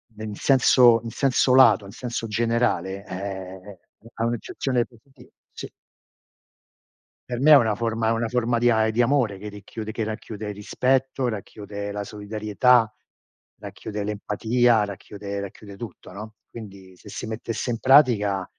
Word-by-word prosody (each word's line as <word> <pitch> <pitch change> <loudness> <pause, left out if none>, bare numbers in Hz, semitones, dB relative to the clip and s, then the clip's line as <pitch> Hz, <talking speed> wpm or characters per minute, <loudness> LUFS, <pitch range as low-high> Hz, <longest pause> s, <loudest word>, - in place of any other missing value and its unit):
nel 105 -1 -7
senso 125 -3 +5
in 115 - -5
senso 130 -1 +2
lato, 115 -7 +6
in 100 - -10
senso 115 0 -5
generale, 105 -4 -1
ehm, 95 0 -7 0.4
ha 115 - -1
un'accezione 120 +1 -1 0.7
sì. - - -8 1.6
Per 120 -1 -3
me 150 +4 +5
è - - +11
una 110 -6 +4
forma 115 0 -1
è - - +2
una 115 0 0
forma 120 0 0
di 120 +1 +3
a 110 -1 +2
di 115 +3 +1
amore 120 -6 +1
che 105 - -9
ricchiude 105 +2 -8
che 115 - -2
racchiude 110 -1 -6
rispetto, 130 +5 0
racchiude 100 -1 -6
la 105 0 -4
solidarietà, 110 +3 +1 0.7
racchiude 105 -1 -6
l'empatia, 110 +3 +1
racchiude 100 0 -7
racchiude 100 0 -9
tutto, 100 -4 -10
no, 105 +3 -9 0.2
quindi, 95 -4 -11
se 105 - -17
si - - -6
mettesse 115 +2 -4
in 115 - -3
pratica, 115 -9 +4
110 Hz, 140 wpm, -24 LUFS, 100-120 Hz, 1.6 s, è